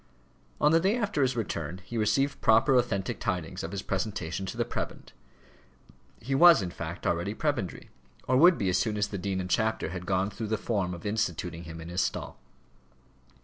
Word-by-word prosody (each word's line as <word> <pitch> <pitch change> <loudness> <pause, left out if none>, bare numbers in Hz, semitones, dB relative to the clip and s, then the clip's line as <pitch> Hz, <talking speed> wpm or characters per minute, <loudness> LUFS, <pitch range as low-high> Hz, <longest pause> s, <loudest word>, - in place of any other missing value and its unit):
On 150 - +4
the 165 - +5
day 195 +7 +2
after 205 -10 -1
his 130 -2 +2
return 85 -6 -3
he 120 - -8
received 135 +6 +1
proper 115 +4 +5
authentic 120 -3 0
tidings 90 -3 -3
of 80 - -5
his 100 -1 -4
presentation 95 -2 -3
to - - -6
the - - +1
prebend. - - -6 1.1
He 135 +4 -4
was, 165 - +7
in 90 - -4
fact, 85 -1 -7
already 85 +5 0
prebendary, 145 - -2 0.4
or 130 - +2
would 170 +6 +7
be 100 - -1
as 90 0 +2
soon 105 +3 -1
as 105 0 0
the 100 - -4
dean 95 +1 -2
and 90 - -3
chapter 110 -1 0
had 90 0 -6
gone 95 +1 +1
through 110 +2 -5
the 110 +1 0
form 100 -5 -1
of 85 - -12
instituting 90 -5 -2
him 80 +1 -8
in 80 +1 -8
his 90 +1 0
stall. - - -3
100 Hz, 195 wpm, -28 LUFS, 90-120 Hz, 1.1 s, was